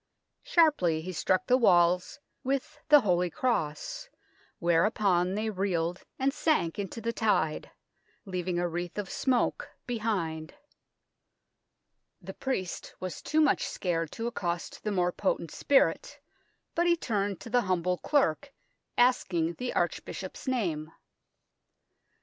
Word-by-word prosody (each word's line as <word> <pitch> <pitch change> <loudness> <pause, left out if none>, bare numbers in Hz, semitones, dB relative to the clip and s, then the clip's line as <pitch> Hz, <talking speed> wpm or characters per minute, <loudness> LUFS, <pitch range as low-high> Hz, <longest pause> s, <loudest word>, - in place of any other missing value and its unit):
" - - -54
Sharply 185 - +3
he 185 - -4
struck 185 +2 +1
the 255 +1 +4
walls 180 -1 +3 0.2
with 270 0 -2
the 295 -1 +8
holy 180 -4 +2
cross, 255 - -2 0.5
whereupon 180 +1 +2
they 215 +1 -1
reeled 180 -3 -1 0.2
and 270 +1 +1
sank 250 - +1
into 200 +3 -4
the 230 +1 -2
tide, 205 -9 0 0.6
leaving 180 -2 -2
a 175 0 +1
wreath 175 +2 -4
of 205 -2 -4
smoke 255 -3 0 0.2
behind. 190 -10 -2 1.6
The - - -8
priest 195 -10 -4
was 185 -2 -5
too 310 +1 +1
much 300 - +3
scared 165 -4 -2
to 230 - -4
accost 175 -8 -3
the 210 - -1
more 180 -2 +1
potent 175 -4 -1
spirit, 280 - +2 0.5
but 345 +1 +2
he 340 0 +4
turned 205 - -1
to 230 - -9
the 245 0 +4
humble 180 -2 0
clerk, 280 - +1 0.5
asking 180 -9 +2
the 250 0 -2
archbishop's - - -3
name. 170 -12 -1
190 Hz, 125 wpm, -29 LUFS, 175-245 Hz, 1.6 s, the